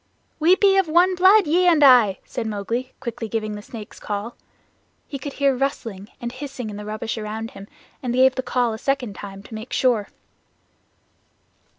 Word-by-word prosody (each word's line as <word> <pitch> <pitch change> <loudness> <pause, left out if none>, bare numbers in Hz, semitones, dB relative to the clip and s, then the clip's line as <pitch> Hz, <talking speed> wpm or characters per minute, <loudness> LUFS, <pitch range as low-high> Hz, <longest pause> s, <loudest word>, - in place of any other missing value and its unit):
"We 335 +4 +5
be 390 0 +4
of 385 -3 +3
one 350 +4 +4
blood, 375 +3 +6
ye 350 +4 +3
and 325 -4 +5
I," 240 -8 +6
said 235 -3 -4
Mowgli, 230 +5 -3
quickly 230 -3 -5
giving 215 -1 -2
the 205 - -7
Snake's 215 0 -10
Call. 210 +3 -5 0.7
He 275 - -6
could 280 +1 -6
hear 275 -2 +2
rustling 230 -7 -3
and 240 0 -4
hissing 255 -4 -6
in - - -8
the 210 - -7
rubbish 215 +2 -4
all - - -5
round 220 +2 -5
him 195 0 -11 0.3
and 250 - -2
gave 260 +1 +4
the 260 - -2
Call 245 -3 0
a 220 - -7
second 260 -5 -1
time, 195 0 -9
to 220 - -13
make 220 +3 -8
sure. 235 -6 +1
245 Hz, 190 wpm, -22 LUFS, 215-280 Hz, 0.7 s, blood